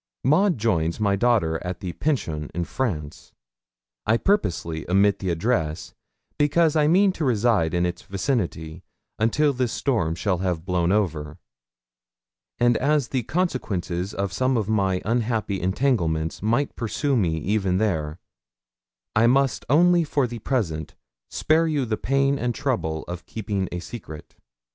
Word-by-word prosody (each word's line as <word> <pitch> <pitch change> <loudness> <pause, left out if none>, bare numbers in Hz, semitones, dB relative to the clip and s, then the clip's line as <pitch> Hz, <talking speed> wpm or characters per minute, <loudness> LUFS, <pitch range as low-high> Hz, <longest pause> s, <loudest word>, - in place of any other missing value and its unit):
Maud 175 +5 +3
joins 85 -7 0
my 100 -2 +2
daughter 100 -8 +1
at 90 0 -4
the 90 -2 -5
Pension, 80 - -2
in 85 - -1
France. 80 - -4 0.7
I 110 - +4
purposely 85 - -1
omit 100 +1 +3
the 95 - -2
address, 85 -3 -1 0.5
because 155 +2 +3
I 150 -1 +3
mean 190 +5 +4
to 165 - -4
reside 110 - +2
in 85 0 +2
its 90 0 -3
vicinity 95 - -3 0.4
until 145 +7 +2
this 125 -2 -1
storm 105 - 0
shall 90 0 -1
have 90 -3 -2
blown 90 -2 +1
over; 80 -8 -1 1.2
and 120 -1 +3
as 145 -2 +1
the 130 - 0
consequences 105 - -2
of 100 -2 -3
some 130 0 +1
of 105 -3 -1
my 95 -4 +1
unhappy 110 -3 -1
entanglements 90 - 0
might 120 +7 0
pursue 135 +5 -1
me 85 -9 +1
even 95 +2 0
there, 80 -7 -1 1.0
I 110 +2 +5
must 135 +1 +2
only 175 +4 +5
for 145 -3 0
the 120 -1 -6
present 90 - -2 0.3
spare 160 +1 +2
you 145 -4 0
the 110 -2 -1
pain 135 +4 +1
and 120 -1 -1
trouble 110 - -2
of 90 -1 -7
keeping 100 -4 -3
a 90 - -3
secret. 85 -6 -9
105 Hz, 145 wpm, -24 LUFS, 85-130 Hz, 1.2 s, I